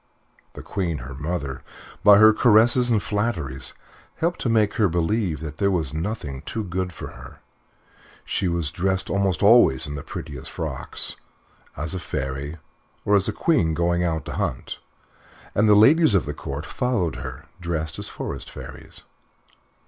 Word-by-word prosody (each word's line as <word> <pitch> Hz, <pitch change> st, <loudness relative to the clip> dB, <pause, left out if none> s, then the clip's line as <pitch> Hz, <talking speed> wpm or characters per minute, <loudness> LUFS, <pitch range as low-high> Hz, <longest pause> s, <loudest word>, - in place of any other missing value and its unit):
The -, -, -9 dB
Queen, 85 Hz, -5 st, -2 dB
her 70 Hz, -, -7 dB
mother, 75 Hz, -2 st, -4 dB, 0.4 s
by 105 Hz, -1 st, +9 dB
her 110 Hz, +1 st, +8 dB
caresses 120 Hz, +3 st, +5 dB
and 110 Hz, -4 st, +2 dB
flatteries, 95 Hz, -, -2 dB, 0.4 s
helped 170 Hz, +2 st, -1 dB
to 120 Hz, -, 0 dB
make 110 Hz, -2 st, +3 dB
her 105 Hz, -4 st, +3 dB
believe 85 Hz, -1 st, 0 dB
that 75 Hz, -1 st, -6 dB
there 100 Hz, -1 st, +2 dB
was 80 Hz, -7 st, -1 dB
nothing 80 Hz, -6 st, -4 dB
too 110 Hz, -, -4 dB
good 90 Hz, -1 st, -3 dB
for -, -, -8 dB
her. -, -, -12 dB, 0.9 s
She 95 Hz, -, -1 dB
was 85 Hz, -4 st, -1 dB
dressed 95 Hz, +3 st, -1 dB
almost 95 Hz, -4 st, +1 dB
always 100 Hz, -, +6 dB
in 75 Hz, -, -5 dB
the 70 Hz, -, -5 dB
prettiest 80 Hz, -5 st, -7 dB
frocks, -, -, -5 dB, 0.6 s
as 75 Hz, +3 st, -2 dB
a 95 Hz, -, -3 dB
fairy, 70 Hz, 0 st, -4 dB, 0.5 s
or 105 Hz, -, +4 dB
as 100 Hz, -1 st, +3 dB
a -, -, +1 dB
queen 85 Hz, -, +1 dB
going 85 Hz, +1 st, +1 dB
out 80 Hz, -4 st, -1 dB
to -, -, -6 dB
hunt, -, -, -3 dB, 0.7 s
and 105 Hz, +1 st, +3 dB
the 105 Hz, -, +7 dB
ladies 135 Hz, +4 st, +6 dB
of 95 Hz, -, +2 dB
the 75 Hz, -, -4 dB
Court 70 Hz, +3 st, -6 dB
followed 115 Hz, -, -1 dB
her 65 Hz, 0 st, -7 dB
dressed 80 Hz, -3 st, -3 dB
as -, -, -6 dB
forest -, -, -6 dB
fairies. 65 Hz, -1 st, -11 dB
90 Hz, 165 wpm, -24 LUFS, 75-105 Hz, 0.9 s, by